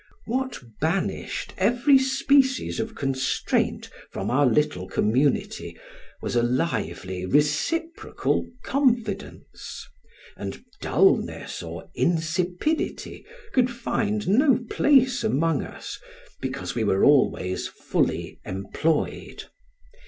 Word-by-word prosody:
What 260 Hz, -, -2 dB, 0.2 s
banished 170 Hz, +5 st, -2 dB
every 245 Hz, +7 st, +5 dB
species 265 Hz, -1 st, +2 dB
of 225 Hz, 0 st, -3 dB
constraint 135 Hz, -6 st, -1 dB, 0.2 s
from 95 Hz, +3 st, -3 dB
our 140 Hz, +2 st, +4 dB
little 115 Hz, -8 st, +1 dB
community, 125 Hz, +9 st, 0 dB, 0.5 s
was -, -, -2 dB
a 120 Hz, -, +4 dB
lively 95 Hz, -, -1 dB
reciprocal 155 Hz, -, 0 dB, 0.2 s
confidence, 235 Hz, -7 st, -2 dB, 0.5 s
and -, -, -7 dB, 0.2 s
dulness 390 Hz, -, +1 dB
or -, -, -8 dB
insipidity 175 Hz, -, -1 dB, 0.3 s
could 250 Hz, -1 st, +3 dB
find 215 Hz, -4 st, -2 dB
no 255 Hz, +6 st, +5 dB
place 260 Hz, -4 st, +4 dB
among 165 Hz, -6 st, +1 dB
us, -, -, -8 dB, 0.4 s
because 130 Hz, +1 st, -4 dB
we 115 Hz, -, -1 dB
were 100 Hz, -2 st, +2 dB
always 130 Hz, -10 st, +3 dB
fully -, -, -2 dB
employed. 100 Hz, -, -2 dB
175 Hz, 95 wpm, -25 LUFS, -, 0.5 s, every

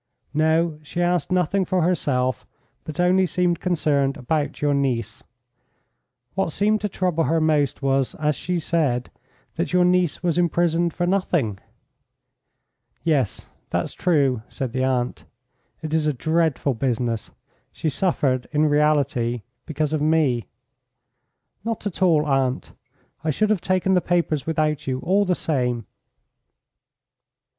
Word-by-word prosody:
"No, 160 Hz, +1 st, +2 dB
she 150 Hz, +3 st, -6 dB
asked 175 Hz, -1 st, +1 dB
nothing 185 Hz, +2 st, +2 dB
for 185 Hz, -1 st, 0 dB
herself, 130 Hz, -, 0 dB, 0.4 s
but 155 Hz, +2 st, -7 dB
only 185 Hz, +1 st, +4 dB
seemed 175 Hz, 0 st, 0 dB
concerned 145 Hz, -6 st, +1 dB
about 145 Hz, +4 st, -2 dB
your 145 Hz, -1 st, +2 dB
niece. 120 Hz, -5 st, -1 dB, 1.1 s
What 195 Hz, -4 st, -1 dB
seemed 210 Hz, +5 st, +1 dB
to 210 Hz, -, -1 dB
trouble 180 Hz, -4 st, 0 dB
her 165 Hz, +1 st, +2 dB
most 150 Hz, -3 st, +1 dB
was, 135 Hz, -1 st, +1 dB
as 150 Hz, -1 st, 0 dB
she 180 Hz, -1 st, -2 dB
said, 145 Hz, -7 st, 0 dB, 0.5 s
that -, -, -2 dB
your 180 Hz, -1 st, +4 dB
niece 180 Hz, -2 st, +1 dB
was 175 Hz, -1 st, +1 dB
imprisoned 170 Hz, 0 st, +2 dB
for 175 Hz, -, -2 dB
nothing." 175 Hz, -, 0 dB, 1.4 s
"Yes, 140 Hz, -10 st, 0 dB, 0.2 s
that's -, -, -2 dB
true," 140 Hz, -9 st, +1 dB
said 130 Hz, -4 st, -4 dB
the 130 Hz, -1 st, 0 dB
aunt. 125 Hz, -2 st, -1 dB, 0.6 s
"It 155 Hz, -1 st, -4 dB
is 160 Hz, -1 st, +2 dB
a 150 Hz, -, +2 dB
dreadful 160 Hz, 0 st, +1 dB
business. 120 Hz, -2 st, -1 dB, 0.4 s
She 160 Hz, -, -2 dB
suffered, 135 Hz, -6 st, 0 dB
in 150 Hz, 0 st, +2 dB
reality, 145 Hz, -6 st, +1 dB, 0.2 s
because 155 Hz, 0 st, -1 dB
of 155 Hz, -, 0 dB
me." 150 Hz, -8 st, +2 dB, 1.2 s
"Not 225 Hz, -1 st, -3 dB
at 200 Hz, -3 st, -4 dB
all, 160 Hz, -5 st, +4 dB
aunt. 135 Hz, -2 st, 0 dB, 0.5 s
I 160 Hz, -, -1 dB
should 210 Hz, +8 st, +1 dB
have 205 Hz, -5 st, +1 dB
taken 185 Hz, 0 st, +1 dB
the 180 Hz, -, +4 dB
papers 170 Hz, -5 st, 0 dB
without 155 Hz, -3 st, 0 dB
you 130 Hz, -1 st, 0 dB
all 200 Hz, +3 st, +2 dB
the 180 Hz, -1 st, +1 dB
same." 125 Hz, -8 st, -1 dB
155 Hz, 135 wpm, -23 LUFS, 135-175 Hz, 1.4 s, only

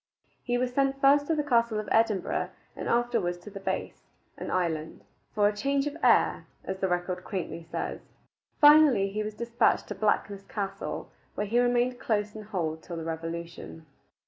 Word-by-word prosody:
He 245 Hz, -1 st, 0 dB
was 250 Hz, 0 st, -1 dB
sent 275 Hz, 0 st, +1 dB
first 285 Hz, +1 st, +5 dB
to 325 Hz, -, +1 dB
the 300 Hz, -, 0 dB
castle 235 Hz, -5 st, +2 dB
of 215 Hz, -, -5 dB
Edinburgh 220 Hz, -4 st, +1 dB, 0.3 s
and -, -, -4 dB
afterward 235 Hz, -7 st, +1 dB
to 210 Hz, -, -10 dB
the 195 Hz, -, -7 dB
Bass 195 Hz, -, -3 dB, 0.3 s
(an -, -, -6 dB
island), 160 Hz, -3 st, -2 dB, 0.3 s
"for 205 Hz, -1 st, +4 dB
a 205 Hz, -, -1 dB
change 275 Hz, +5 st, 0 dB
of 295 Hz, 0 st, -3 dB
air," -, -, +3 dB, 0.2 s
as 190 Hz, 0 st, -4 dB
the 190 Hz, -, +1 dB
record 180 Hz, 0 st, -2 dB
quaintly 180 Hz, -4 st, -4 dB
says. -, -, -3 dB, 0.6 s
Finally, 295 Hz, -9 st, +7 dB
he 210 Hz, +2 st, -2 dB
was 215 Hz, 0 st, -4 dB
despatched 235 Hz, +1 st, +1 dB
to -, -, -2 dB
Blackness 205 Hz, -2 st, 0 dB
Castle, 195 Hz, -1 st, -5 dB, 0.2 s
where 210 Hz, -, -1 dB
he 230 Hz, +4 st, +1 dB
remained 245 Hz, 0 st, +2 dB
close 210 Hz, -1 st, -1 dB
in 215 Hz, -, -6 dB
hold 170 Hz, -7 st, -3 dB
till 170 Hz, 0 st, -7 dB
the 165 Hz, -, -4 dB
revolution. 165 Hz, 0 st, -6 dB
210 Hz, 175 wpm, -28 LUFS, 185-245 Hz, 0.6 s, Finally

